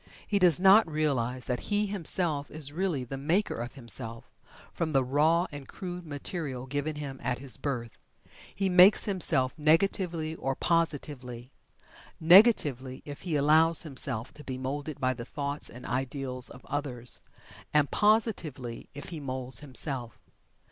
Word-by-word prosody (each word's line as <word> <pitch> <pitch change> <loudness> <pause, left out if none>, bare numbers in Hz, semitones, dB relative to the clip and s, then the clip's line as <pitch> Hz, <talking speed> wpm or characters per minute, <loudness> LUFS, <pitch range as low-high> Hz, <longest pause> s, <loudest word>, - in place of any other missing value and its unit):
He 205 - +1
does 175 -4 +5
not 195 -1 +6
realize 130 -5 -1
that 125 -1 -1
he 205 0 +2
himself 170 -6 0
is 150 -2 -4
really 170 -6 -1
the 135 +2 -6
maker 170 +9 +1
of 120 +2 -7
himself, 115 -2 -3 0.5
from 160 -2 -2
the 135 -1 +3
raw 155 +6 +3
and 145 -2 -9
crude 180 -2 -7
material 145 -3 -4
given 145 +3 -3
him 140 -3 -6
at 125 - -1
his 135 -1 -2
birth. 120 -6 -4 0.6
He 195 -1 0
makes 185 +2 +7
himself 160 -10 +1
negatively 165 0 +1
or 135 -4 -3
positively. 140 -7 -2 0.7
Negatively, 160 - +5
if 145 -1 -8
he 170 -4 -2
allows 155 +3 +4
himself 130 -6 -2
to 150 - -12
be 130 -2 -5
moulded 140 +3 -4
by 130 0 +1
the 120 -1 -7
thoughts 140 +3 -3
and 125 +1 -11
ideals 130 0 -2
of 130 - -13
others, 130 -4 -4 0.5
and 150 -1 +2
positively, 185 - 0
if 145 - -8
he 165 -3 -6
moulds 130 -3 -3
himself. 135 -4 -3
145 Hz, 150 wpm, -29 LUFS, 130-165 Hz, 0.7 s, makes